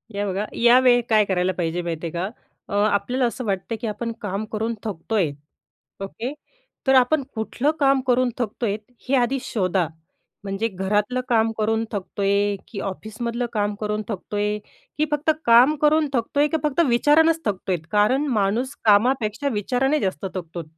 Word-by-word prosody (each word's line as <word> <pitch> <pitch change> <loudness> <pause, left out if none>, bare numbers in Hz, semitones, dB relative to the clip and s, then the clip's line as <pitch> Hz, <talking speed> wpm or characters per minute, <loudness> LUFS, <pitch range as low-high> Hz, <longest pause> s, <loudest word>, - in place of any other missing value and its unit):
या, 205 0 -1
बघा 195 +2 -2
या 240 +2 +6
वेळी 245 -1 +5
काय 215 -2 +4
करायला 185 -1 +1
पाहिजे 175 -1 -2
माहिती 170 -1 -4
आहे - - -6
का 175 +4 -2 0.4
अ, - - -6 0.2
आपल्याला 245 +6 0
असं 245 +1 -3
वाटतं, 195 +2 -2
की 230 - -2
आपण 230 +2 -3
काम 205 0 -3
करून 225 +2 -1
थकतोय. 200 -3 -1 0.7
ओके? 230 +7 -5 0.5
तर 265 - +5
आपण 265 +3 +4
कुठलं 240 +6 0
काम 275 -2 +4
करून 250 0 +3
थकतोय? 225 -3 -2 0.3
हे 275 - +4
आधी 250 +1 +2
शोधा. 190 -8 0 0.6
म्हणजे 195 +3 -1
घरातलं 205 +5 -1
काम 225 -2 +3
करून 220 +1 +1
थकतोय, 200 0 0
की 200 - -6
ऑफिसमधलं 230 +5 -4
काम 205 -1 0
करून 210 0 -2
थकतोय, 210 0 -2 0.4
की 305 - +3
फक्त 295 +1 +1 0.2
काम 240 +5 +7
करून 305 0 +4
थकतोय, 285 +5 +1
की 320 - 0
फक्त 300 +2 +1
विचारानंच 310 +7 +4
थकतोयत? 185 -5 -2
कारण 215 +8 +3
माणूस 225 +7 0
कामापेक्षा 225 +4 +3
विचाराने 265 +8 +1
जास्त 190 -2 -2
थकतोत. 170 -2 -6
220 Hz, 155 wpm, -23 LUFS, 200-255 Hz, 0.7 s, काम